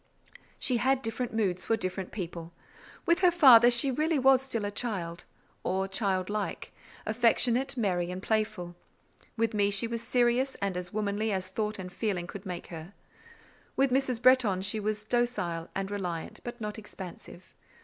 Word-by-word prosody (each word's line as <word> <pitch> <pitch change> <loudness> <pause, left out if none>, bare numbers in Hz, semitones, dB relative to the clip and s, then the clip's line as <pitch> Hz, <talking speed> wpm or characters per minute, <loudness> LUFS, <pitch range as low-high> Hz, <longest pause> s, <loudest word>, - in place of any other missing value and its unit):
She 250 - +1
had 265 +2 +1
different 225 +2 -2
moods 195 -5 -1
for 225 - +2
different 185 -1 -4
people. 170 -4 -6 0.5
With 340 0 +3
her 365 -1 +6
father 260 -9 +8
she 245 +3 +3
really 310 +4 +1
was 265 -1 +5
still 235 -6 -3
a 205 - -2
child, 190 -7 -4 0.4
or 190 +1 0
child 190 -2 0
like, 210 0 -4 0.3
affectionate, 240 +3 +2
merry, 180 -6 0
and 180 +1 -4
playful. 215 -4 -2 0.6
With 225 0 +1
me 205 -1 +2
she 200 +2 +2
was 230 0 -3
serious, 245 +2 +1
and 200 -2 -2
as 180 0 -5
womanly 210 +1 -1
as 185 -1 -2
thought 215 +2 -2
and 180 -1 -7
feeling 195 -6 -2
could 195 +3 -9
make 180 -1 -5
her. 165 +4 -9 0.8
With 270 -1 +2
Mrs. 260 -2 +1
Bretton 245 -7 +4
she 210 +2 -1
was 210 0 -2
docile 215 -9 -1
and 195 0 -3
reliant, 180 -5 -4
but 240 0 -7
not 210 0 -5
expansive. 185 -3 -10
215 Hz, 165 wpm, -29 LUFS, 185-240 Hz, 0.8 s, father